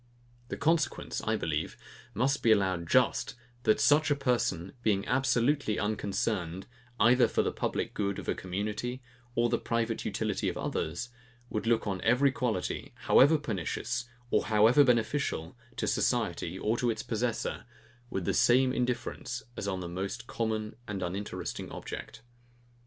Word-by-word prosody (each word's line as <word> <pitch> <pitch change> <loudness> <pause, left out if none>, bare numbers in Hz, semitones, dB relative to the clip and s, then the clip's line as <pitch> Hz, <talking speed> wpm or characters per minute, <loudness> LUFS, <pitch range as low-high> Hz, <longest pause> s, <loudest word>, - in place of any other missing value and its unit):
The - - -5
consequence, 160 +2 0
I - - +2
believe, - - -2 0.4
must 135 +6 +1
be 115 - +4
allowed 95 -5 +2
just, 125 0 +2 0.3
that 215 - +4
such 150 +1 +4
a 145 - +3
person, 120 -10 0
being 100 -4 +1
absolutely 135 -2 +2
unconcerned, 95 -4 -1 0.3
either 120 +3 +6
for - - +1
the - - 0
public - - -2
good 100 -2 -1
of - - -7
a - - +2
community 105 +7 -4 0.3
or 120 0 +3
the - - 0
private 115 -1 -1
utility - - -1
of - - -5
others, 85 +10 -3 0.4
would 110 +1 -2
look 115 -1 +2
on 95 -3 -2
every 125 +4 +4
quality, 120 -7 -2
however 150 +4 +6
pernicious, 120 - -3 0.2
or - - +2
however 110 +6 +6
beneficial, 120 - 0 0.2
to - - -2
society, 95 -7 0
or 110 +4 0
to 120 - +1
its 110 -2 -2
possessor, 115 +1 -2 0.4
with 95 -6 -3
the - - +1
same 130 +1 +4
indifference 120 0 -2
as 100 - -4
on 95 -2 -2
the 90 - -4
most 95 +6 -4
common 110 -2 -2
and 100 -3 -3
uninteresting 95 +4 -4
object. 115 - -7
115 Hz, 150 wpm, -30 LUFS, 100-125 Hz, 0.4 s, either